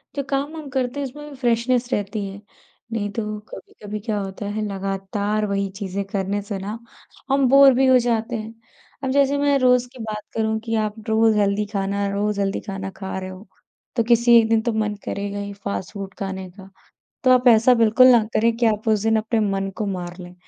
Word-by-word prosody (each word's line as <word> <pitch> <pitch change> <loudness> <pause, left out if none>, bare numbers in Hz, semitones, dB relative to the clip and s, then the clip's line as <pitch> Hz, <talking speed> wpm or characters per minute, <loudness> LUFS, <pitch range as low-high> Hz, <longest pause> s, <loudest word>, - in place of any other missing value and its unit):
जो 280 - -1
काम 285 +3 -1
हम 295 -3 -8
करते 260 +1 -2
हैं, 275 - -2
उसमें 295 +3 -10
भी 280 - -10
फ़्रेशनेस 245 0 0
रहती 205 0 -2
है। 195 +1 -9 0.5
नहीं 205 -2 -1
तो 225 +2 -3 0.3
कभी-कभी 210 0 -8
क्या 210 -1 -2
होता 195 +1 -6
है, 210 +1 -3
लगातार 195 +2 -2
वही 200 -1 -1
चीज़ें 200 0 -3
करने 200 +1 -1
से 200 -1 -5
ना 210 +4 -5 0.5
हम 275 -1 +3
बोर 275 -1 +8
भी 265 +1 +3
हो 260 -1 +6
जाते 230 -1 -1
हैं। 220 +1 -6 0.5
अब 265 - -1
जैसे 280 0 +3
मैं 285 -1 +3
रोज़ 250 -1 +3
की 255 - -13
बात 215 -1 -4
करूँ 220 0 0
कि 225 0 -1
आप 210 +1 -5
रोज़ 220 -1 +3
हेल्दी 205 +1 +1
खाना 200 0 -1
रोज़ 205 0 -1
हेल्दी 195 0 -1
खाना 195 0 -4
खा 190 -1 -5
रहे 185 0 -6
हो, 185 +3 -11 0.5
तो 230 - +2
किसी 235 0 +5
एक 220 0 +1
दिन 225 -1 +3
तो 235 0 -1
मन 210 -1 -1
करेगा 200 0 -4
ही 200 0 -5
फ़ास्ट 200 -2 -5
फ़ूड 195 -2 -7
खाने 190 -1 -5
का। 190 0 -14 0.6
तो 255 - +5
आप 250 0 +5
ऐसा 235 +2 +6
बिल्कुल 230 +2 +5
ना 240 -3 +6
करें 230 +1 +3
कि 235 -1 +2
आप 215 0 0
उस 215 -2 +2
दिन 225 0 +2
अपने 220 +1 0
मन 195 -1 -1
को 210 - -2
मार 180 -2 -4
लें। 180 0 -10
215 Hz, 215 wpm, -22 LUFS, 200-240 Hz, 0.6 s, बोर